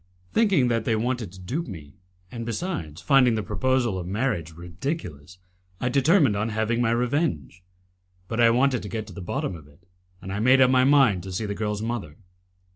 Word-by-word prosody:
Thinking 195 - +3
that 115 -2 0
they 110 - +1
wanted 115 -3 -2
to 95 - -13
dupe 130 - -4
me, 80 - -10 0.3
and 115 -1 -6
besides, 110 - -4
finding 130 -5 +4
the 110 - -2
proposal 130 -7 0
of 90 - -6
marriage 100 - -2
ridiculous, 85 - -6 0.4
I 125 - -1
determined 140 - +3
on 105 +3 -1
having 110 +2 0
my 115 - +2
revenge. 115 - -1 0.7
But 115 +3 -4
I 115 -1 +6
wanted 125 +1 +2
to 105 - -7
get 110 0 -4
to 100 - -12
the 100 - -8
bottom 130 - -3
of 75 -3 -13
it, 80 +5 -24 0.3
and 95 +1 -7
I 100 - -2
made 130 +4 +5
up 130 -1 +5
my 130 0 +4
mind 135 -10 +4
to 95 +2 -8
see 95 +4 -3
the 100 - -3
girl's 105 0 -3
mother. 110 -11 -4
115 Hz, 200 wpm, -25 LUFS, 95-130 Hz, 0.7 s, I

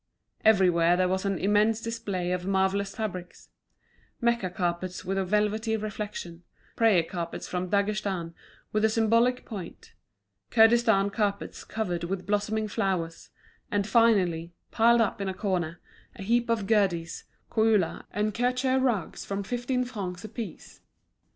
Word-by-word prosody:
Everywhere 180 -5 +4
there 185 0 +2
was 190 +1 -1
an 195 -1 0
immense 210 +3 +2
display 210 -6 -3
of 180 0 -2
marvellous 195 +1 +1
fabrics; 185 -5 -6 0.7
Mecca 235 -5 +1
carpets 180 0 -3
with 195 - -1
a 195 - +1
velvety 210 +3 0
reflection, 205 -5 -6 0.3
prayer 215 -7 +4
carpets 170 0 -5
from 180 0 -3
Daghestan 200 -4 -1 0.4
with 215 0 0
a 220 - +5
symbolic 230 +3 +2
point, 195 -7 -9 0.6
Kurdistan 220 - +4
carpets 200 -1 -2
covered 180 -6 -3
with 185 +1 -4
blossoming 210 +1 0
flowers; 185 -5 -2 0.4
and 205 -1 0
finally, 190 -7 +2 0.2
piled 235 +1 +4
up 205 -2 0
in 195 - -1
a 190 - -4
corner, 175 -5 -2 0.4
a - - -8
heap 235 +3 +1
of 225 -3 +1
Gherdes, 190 -6 0 0.3
Koula, 220 -6 +2
and 210 +1 -1
Kirchur 250 +3 +1
rugs 240 -8 -1
from 200 0 -3
fifteen 245 +3 -1
francs 190 -7 -5
a 215 - -7
piece. 220 -6 -8
200 Hz, 140 wpm, -27 LUFS, 185-225 Hz, 0.7 s, a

